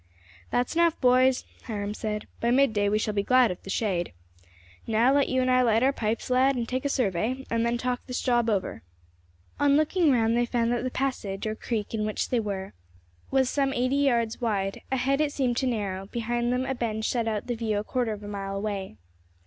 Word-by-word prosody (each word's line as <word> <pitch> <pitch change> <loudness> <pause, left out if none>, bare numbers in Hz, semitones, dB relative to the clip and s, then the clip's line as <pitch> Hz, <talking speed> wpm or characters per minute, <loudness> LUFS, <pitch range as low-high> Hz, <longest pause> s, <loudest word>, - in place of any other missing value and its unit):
"That's 245 0 0
enough, 335 -1 +3
boys," 255 0 +4 0.2
Hiram 205 -3 -3
said; 210 -1 -4
"by 235 - 0
midday 230 -6 +3
we 210 - +2
shall 215 0 -1
be 205 - +1
glad 255 +1 +4
of 180 - -7
the - - -11
shade. 190 - -1 0.7
Now, 230 +4 +3
let 280 -1 +2
you 260 0 +1
and 255 - +1
I 255 0 +4
light 230 -1 +3
our 270 +1 +3
pipes, 225 +1 -2
lad, 260 +2 +4
and 235 -2 -2
take 255 +3 -3
a - - +2
survey, 250 +2 -1
and 230 0 +1
then 235 +1 +1
talk 250 0 -3
this 250 - -3
job 240 -2 +1
over." 200 -4 -1 0.8
On 285 0 +4
looking 310 +1 +3
round, 230 -2 +2
they 240 0 +1
found 235 -1 0
that 240 0 0
the 255 - -1
passage, 235 -8 -3
or 215 - -1
creek, 220 -1 -4
in 215 -1 -1
which 215 0 -2
they 245 - +1
were 195 - -4 0.6
was 265 -1 +2
some 275 0 0
eighty 255 +2 +1
yards 235 -5 +1
wide; 195 -4 -1
ahead 270 +2 +1
it 300 -1 +1
seemed 255 -4 0
to 260 - +1
narrow; 195 -5 -2
behind 240 +2 -1
them, 250 +1 0
a 265 - -1
bend 220 -3 -2
shut 235 -2 0
out 215 -2 -2
the 245 - -2
view 225 -2 -1
a 205 - -1
quarter 245 0 -1
of 210 -1 -6
a - - -7
mile 195 -1 -4
away. 195 - -4
235 Hz, 220 wpm, -27 LUFS, 215-255 Hz, 0.8 s, boys